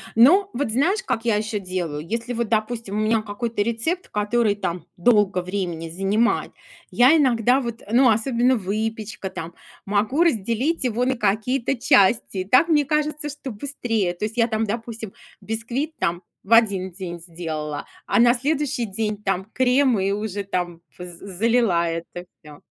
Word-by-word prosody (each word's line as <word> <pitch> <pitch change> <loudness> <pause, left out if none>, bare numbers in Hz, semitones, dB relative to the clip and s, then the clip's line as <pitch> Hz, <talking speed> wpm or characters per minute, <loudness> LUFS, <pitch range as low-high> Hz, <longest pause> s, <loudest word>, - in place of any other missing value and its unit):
Ну 355 - +6
вот 245 -2 -1
знаешь, 360 - +1
как 235 -8 -2
я 230 -3 +3
еще 215 0 -2
делаю? 175 -6 -4
Если, 230 +4 -3
вот, 235 -2 -2
допустим, 220 -1 -1
у - - 0
меня 215 +1 +2
какой-то 215 +1 -3
рецепт, 235 - -1
который 210 +1 +1
там 180 -3 -4
долго 200 -1 +3
времени 180 -3 -4
занимает, 195 +7 0 0.4
я 255 +6 +6
иногда, 250 -3 +3
вот 235 -2 -5
Ну, 250 +2 +5
особенно 240 +3 +2
выпечка 215 0 -3
там, 165 -2 -7 0.3
могу 210 +10 +1
разделить 260 - 0
его 245 0 0
на 260 +1 +1
какие-то 230 +5 0
части. 230 -5 +3
И 185 - -2
так 255 - +4
мне 295 -3 +3
кажется, 300 +1 -1
что 285 -2 -7
быстрее. 225 -5 -2
То 175 +4 -4
есть 220 +3 -6
я 230 -1 +4
там, 220 -1 -1
допустим, 225 -1 -5 0.3
бисквит 235 +8 -4
там 170 +1 -1 0.2
в 215 - +1
один 200 -5 +3
день 175 -1 -7
сделала, 160 -3 -5 0.2
а - - +1
на 240 +1 +6
следующий 280 -1 -1
день 210 +1 -3
там 195 -2 -1
крем, 255 -2 +3
и 195 +1 0
уже 205 -1 -3
там 175 -3 -3 0.2
п 180 - -7
з 175 0 -11
залила 225 -6 +2
это 170 +1 -5 0.2
всё. 150 -2 -14
220 Hz, 165 wpm, -23 LUFS, 195-245 Hz, 0.4 s, Ну